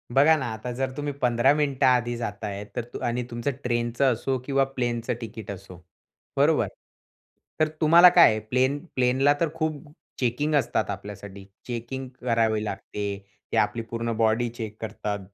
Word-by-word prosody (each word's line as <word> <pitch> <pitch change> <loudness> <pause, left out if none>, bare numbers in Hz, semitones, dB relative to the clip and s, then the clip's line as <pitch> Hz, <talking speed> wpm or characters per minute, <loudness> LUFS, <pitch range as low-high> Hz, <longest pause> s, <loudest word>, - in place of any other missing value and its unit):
बघा 145 +4 +6
ना, 135 - -3
आता 110 +3 -6
जर 130 +2 -2
तुम्ही 145 0 -3
15 125 +2 +4
मिनिटं 145 -2 +1
आधी 120 -2 +3
जाता 110 -2 -4
आहे, 100 0 -5
तर - - -1 0.2
अ - - -5
आणि 120 +1 -1
तुमचं 120 +4 -2
ट्रेनचं 120 +2 +1
असो 130 +3 -1
किंवा 135 0 +2
प्लेनचं 120 -2 -1
तिकीट 110 -2 -8
असो, 95 -1 -10 0.6
बरोबर. - - +3 0.9
तर 155 - +4
तुम्हाला 170 +3 +8
काय 175 - +9
आहे, 110 - -1
प्लेन 130 +6 +1 0.2
प्लेनला 130 +3 +3
तर 170 - +1
खूप 155 -2 -2 0.4
चेकिंग 135 +5 0
असतात 140 -4 +1
आपल्यासाठी. 100 -1 -7 0.2
चेकिंग 125 +2 -5
करावी 115 -3 +1
लागते. 100 -1 -4 0.3
ते - - 0
आपली 105 +3 +1
पूर्ण 115 0 -2
बॉडी 115 +2 +2
चेक 115 -2 -7
करतात, 105 -1 -4
120 Hz, 160 wpm, -25 LUFS, 110-135 Hz, 0.9 s, काय